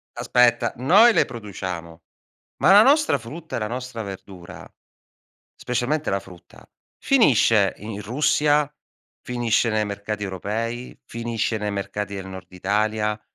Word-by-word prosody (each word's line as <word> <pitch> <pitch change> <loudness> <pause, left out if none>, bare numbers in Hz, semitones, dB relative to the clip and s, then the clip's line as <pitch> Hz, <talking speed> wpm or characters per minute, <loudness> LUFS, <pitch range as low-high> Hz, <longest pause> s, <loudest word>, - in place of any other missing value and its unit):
Aspetta, 120 -1 +2
noi 195 - +6
le - - +3
produciamo, 90 -7 -7 0.6
ma 155 +7 +4
la 205 +2 +9
nostra 300 +4 +4
frutta 155 +9 -8
e - - -1
la 110 - -2
nostra 125 -1 -5
verdura, 95 -3 -10 0.9
specialmente 130 +5 -2
la 100 - +1
frutta, 90 -3 -16 0.3
finisce 115 - +3
i - - -12
in 105 -1 -6
Russia, 145 +4 +1 0.5
finisce 120 -2 0
nei 110 -1 +1
mercati 105 0 -4
europei, 110 +6 -4
finisce 115 -1 -2
nei 105 0 -3
mercati 100 +1 -4
del 95 -1 -7
nord 95 0 -10
Italia, 105 +3 -1
110 Hz, 130 wpm, -23 LUFS, 100-125 Hz, 0.9 s, la